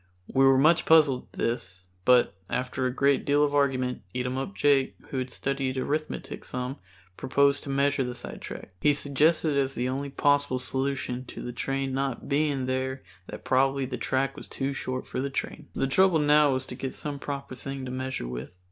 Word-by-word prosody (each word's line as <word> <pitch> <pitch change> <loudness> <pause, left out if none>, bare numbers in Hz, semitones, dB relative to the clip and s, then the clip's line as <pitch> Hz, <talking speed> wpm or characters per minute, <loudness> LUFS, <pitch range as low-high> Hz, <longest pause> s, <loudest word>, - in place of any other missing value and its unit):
We 135 0 +5
were 135 0 +6
much 155 +5 +4
puzzled 150 -5 +5
at - - -35
this, 95 -6 -3 0.2
but 125 -1 +5 0.2
after 125 +1 -1
a - - -1
great 140 +1 +2
deal 145 +1 +3
of 145 -1 +1
argument 130 -3 +1
Eatumup 130 +8 -2
Jake, 140 -2 +3
who 135 - -2
had 130 0 -3
studied 135 0 -2
Arithmetic 150 +4 -3
some, 125 +2 -4 0.4
proposed 140 +1 +2
to - - -6
measure 140 0 +2
the 125 -1 -4
sidetrack. - - -8
He 150 - +5
suggested 145 +2 +2
as 135 -1 +1
the 125 - -1
only 140 +2 -3
possible 145 -1 +2
solution 130 -1 -2
to - - -8
the 120 - -5
train 135 +2 -2
not 135 -2 -2
being 140 -2 +1
there 130 +1 -2 0.2
that - - -9
probably 135 +1 +2
the 130 0 -4
track 130 +3 0
was - - -9
too 135 +1 -2
short 130 -1 -4
for 130 - -3
the 140 - -2
train. 135 - -4
The - - +1
trouble 180 +5 +4
now 150 -1 +5
was 130 0 -2
to - - -7
get 130 0 -5
some 145 -2 -5
proper 140 -1 -5
thing 135 +1 -6
to 125 - -5
measure 130 - -3
with. 60 +1 -5
135 Hz, 190 wpm, -27 LUFS, 130-140 Hz, 0.4 s, were